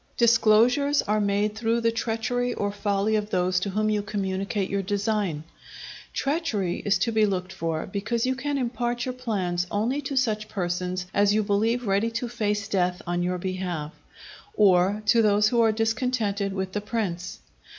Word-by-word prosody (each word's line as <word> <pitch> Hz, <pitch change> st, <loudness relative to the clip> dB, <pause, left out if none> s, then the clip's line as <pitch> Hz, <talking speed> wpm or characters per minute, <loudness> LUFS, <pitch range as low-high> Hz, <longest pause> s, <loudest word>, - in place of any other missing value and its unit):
Disclosures 235 Hz, +5 st, +4 dB
are 210 Hz, +1 st, +1 dB
made 205 Hz, +1 st, +1 dB
through 225 Hz, +1 st, 0 dB
the 230 Hz, 0 st, +2 dB
treachery 230 Hz, +2 st, -1 dB
or 205 Hz, 0 st, -1 dB
folly 205 Hz, +1 st, 0 dB
of 210 Hz, -1 st, -1 dB
those 180 Hz, -1 st, +1 dB
to 200 Hz, -, -3 dB
whom 215 Hz, +2 st, 0 dB
you 210 Hz, -1 st, +1 dB
communicate 195 Hz, -1 st, -2 dB
your 200 Hz, 0 st, -1 dB
design. 200 Hz, -5 st, -1 dB, 0.7 s
Treachery 275 Hz, -, -1 dB
is 200 Hz, -1 st, +2 dB
to 230 Hz, +5 st, 0 dB
be 220 Hz, -1 st, +3 dB
looked 185 Hz, -1 st, -3 dB
for, 165 Hz, -4 st, -2 dB
because 220 Hz, +5 st, -2 dB
you 260 Hz, -, +1 dB
can 285 Hz, +2 st, -2 dB
impart 240 Hz, -1 st, -2 dB
your 255 Hz, -, -3 dB
plans 190 Hz, -8 st, -2 dB
only 235 Hz, +8 st, 0 dB
to 275 Hz, 0 st, -4 dB
such 215 Hz, -4 st, 0 dB
persons 180 Hz, -1 st, -2 dB
as 205 Hz, 0 st, +3 dB
you 215 Hz, -, +2 dB
believe 220 Hz, +4 st, +1 dB
ready 200 Hz, +3 st, +1 dB
to 230 Hz, +2 st, -3 dB
face 210 Hz, -3 st, -2 dB
death 180 Hz, -1 st, 0 dB
on 175 Hz, 0 st, -1 dB
your 180 Hz, +1 st, -1 dB
behalf, 180 Hz, -4 st, -4 dB, 0.6 s
or 195 Hz, +1 st, +4 dB
to 230 Hz, +3 st, +5 dB
those 210 Hz, 0 st, +4 dB
who 235 Hz, 0 st, +2 dB
are 225 Hz, -1 st, +4 dB
discontented 220 Hz, -2 st, 0 dB
with 190 Hz, -1 st, -3 dB
the 210 Hz, -, -2 dB
prince. 200 Hz, -5 st, -3 dB
210 Hz, 170 wpm, -25 LUFS, 190-230 Hz, 0.7 s, to